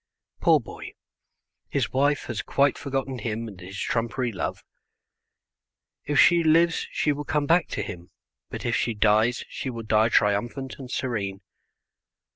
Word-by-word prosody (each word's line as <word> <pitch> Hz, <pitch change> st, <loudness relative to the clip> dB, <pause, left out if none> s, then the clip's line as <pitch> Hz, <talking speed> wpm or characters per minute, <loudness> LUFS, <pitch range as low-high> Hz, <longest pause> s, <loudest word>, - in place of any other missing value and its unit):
Poor -, -, +5 dB
boy, -, -, -10 dB, 0.8 s
his -, -, -1 dB
wife 145 Hz, +2 st, +2 dB
has 110 Hz, -3 st, -4 dB
quite 140 Hz, +2 st, +2 dB
forgotten 135 Hz, -2 st, -3 dB
him 115 Hz, 0 st, -3 dB
and 100 Hz, -4 st, -10 dB
his 95 Hz, +2 st, -8 dB
trumpery 120 Hz, +1 st, -1 dB
love. 100 Hz, -, -4 dB, 1.4 s
If 145 Hz, -, +1 dB
she 170 Hz, -1 st, +6 dB
lives 165 Hz, +1 st, +3 dB
she 150 Hz, -, 0 dB
will 145 Hz, 0 st, -3 dB
come 150 Hz, 0 st, 0 dB
back 170 Hz, +3 st, +3 dB
to 105 Hz, -, -3 dB
him, 90 Hz, -3 st, -8 dB, 0.4 s
but -, -, -6 dB
if -, -, +1 dB
she 115 Hz, -, 0 dB
dies 110 Hz, +3 st, +2 dB
she 130 Hz, -, -5 dB
will 115 Hz, -2 st, -6 dB
die 110 Hz, +1 st, +3 dB
triumphant 120 Hz, +6 st, 0 dB
and 130 Hz, -2 st, -8 dB
serene. 100 Hz, -7 st, -3 dB
120 Hz, 150 wpm, -25 LUFS, 110-140 Hz, 1.4 s, she